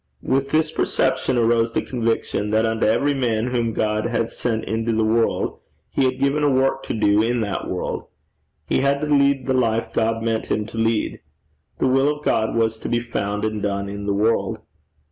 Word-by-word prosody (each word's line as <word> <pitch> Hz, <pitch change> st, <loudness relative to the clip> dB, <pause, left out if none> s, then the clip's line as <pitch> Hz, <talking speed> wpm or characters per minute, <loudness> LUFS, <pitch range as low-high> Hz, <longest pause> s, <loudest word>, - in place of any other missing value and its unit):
With 135 Hz, +1 st, 0 dB
this 155 Hz, +1 st, +1 dB
perception 130 Hz, -4 st, 0 dB
arose 115 Hz, 0 st, +2 dB
the -, -, 0 dB
conviction 115 Hz, -4 st, -1 dB
that 110 Hz, +1 st, +2 dB
unto 110 Hz, -1 st, +1 dB
every 120 Hz, +7 st, +2 dB
man 120 Hz, -3 st, 0 dB
whom 120 Hz, -2 st, 0 dB
God 110 Hz, 0 st, 0 dB
had 115 Hz, -1 st, -1 dB
sent 115 Hz, -2 st, -2 dB
into 115 Hz, +1 st, -1 dB
the 110 Hz, 0 st, +1 dB
world, 115 Hz, +1 st, +1 dB, 0.3 s
he 135 Hz, -, +1 dB
had 130 Hz, 0 st, 0 dB
given 140 Hz, +2 st, +1 dB
a 145 Hz, -, +4 dB
work 135 Hz, 0 st, +2 dB
to -, -, -2 dB
do 105 Hz, -1 st, +3 dB
in 120 Hz, +1 st, 0 dB
that 100 Hz, -3 st, -3 dB
world. -, -, -3 dB, 0.6 s
He -, -, +1 dB
had 140 Hz, +1 st, +1 dB
to -, -, 0 dB
lead 140 Hz, -2 st, +2 dB
the 130 Hz, -, +1 dB
life 115 Hz, -3 st, 0 dB
God 115 Hz, 0 st, 0 dB
meant 115 Hz, -1 st, -1 dB
him 105 Hz, -, 0 dB
to 115 Hz, -, -9 dB
lead. 115 Hz, -1 st, 0 dB, 0.6 s
The -, -, 0 dB
will 135 Hz, +3 st, +2 dB
of 150 Hz, -, -16 dB
God 110 Hz, +1 st, +1 dB
was 110 Hz, -1 st, +1 dB
to -, -, -5 dB
be 120 Hz, -, +1 dB
found 105 Hz, -3 st, -3 dB
and 110 Hz, -1 st, -2 dB
done 100 Hz, -1 st, -2 dB
in 100 Hz, 0 st, -6 dB
the 100 Hz, -, +1 dB
world. 110 Hz, +3 st, +1 dB
115 Hz, 200 wpm, -22 LUFS, 110-130 Hz, 0.6 s, a